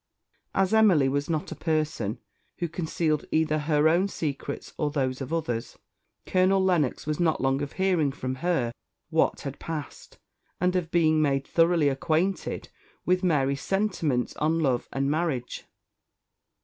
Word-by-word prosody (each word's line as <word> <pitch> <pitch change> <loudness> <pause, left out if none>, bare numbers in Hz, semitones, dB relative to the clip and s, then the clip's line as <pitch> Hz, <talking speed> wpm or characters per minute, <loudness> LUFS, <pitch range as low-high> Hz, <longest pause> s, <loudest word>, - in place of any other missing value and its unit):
As 190 -1 +2
Lady 220 - +5
Emily 170 -11 +5
was 140 +2 -1
not 160 -2 -2
a - - -4
person 155 - -1 0.4
who 175 - -1
concealed 160 -2 -1
either 155 -1 +2
her 150 0 +2
own 175 +5 +3
secrets 140 -6 -5
or 150 - 0
those 135 -2 -1
of 135 - -5
others, 120 -9 -3 0.5
Colonel 185 +1 +3
Lennox 170 -8 +1
was 155 +1 -2
not 165 -3 +2
long 135 +1 +1
of 145 - -4
hearing 180 -7 +1
from 130 -1 -4
her 165 -9 +1 0.4
what - - +2
had 140 0 -6
passed, 155 -3 -7 0.4
and 180 +1 +1
of 175 -3 0
being 155 -2 +3
made 135 -2 +1
thoroughly 165 -2 +3
acquainted 160 +7 -1 0.4
with 180 +1 +2
Mary's 140 -5 +1
sentiments 180 - 0
on 160 +2 +1
love 130 -6 0
and 135 +1 0
marriage. 150 -6 -2
155 Hz, 150 wpm, -27 LUFS, 140-175 Hz, 0.5 s, Lady